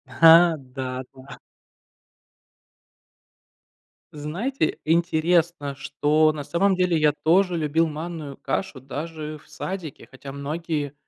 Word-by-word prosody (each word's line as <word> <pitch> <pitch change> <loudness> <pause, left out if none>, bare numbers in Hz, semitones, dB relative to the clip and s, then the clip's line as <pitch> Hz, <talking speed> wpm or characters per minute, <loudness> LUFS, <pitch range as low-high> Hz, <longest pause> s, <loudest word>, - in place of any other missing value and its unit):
Ха, 165 0 +7
да, 130 -1 -6
да. 130 -1 -12 2.8
Знаете, 160 - -2
интересно, 165 -2 +1
что 150 +3 +2
на 150 -1 -5
самом 170 +7 +1
деле 180 -2 +2
я 150 -1 +3
тоже 180 +2 +3
любил 160 +1 +1
манную 155 -2 -6
кашу 135 -1 -3
даже 155 +3 -6
в - - -22
садике, 185 -7 -6
хотя 135 +1 -10
многие 150 0 -3
155 Hz, 105 wpm, -24 LUFS, 140-170 Hz, 2.8 s, Ха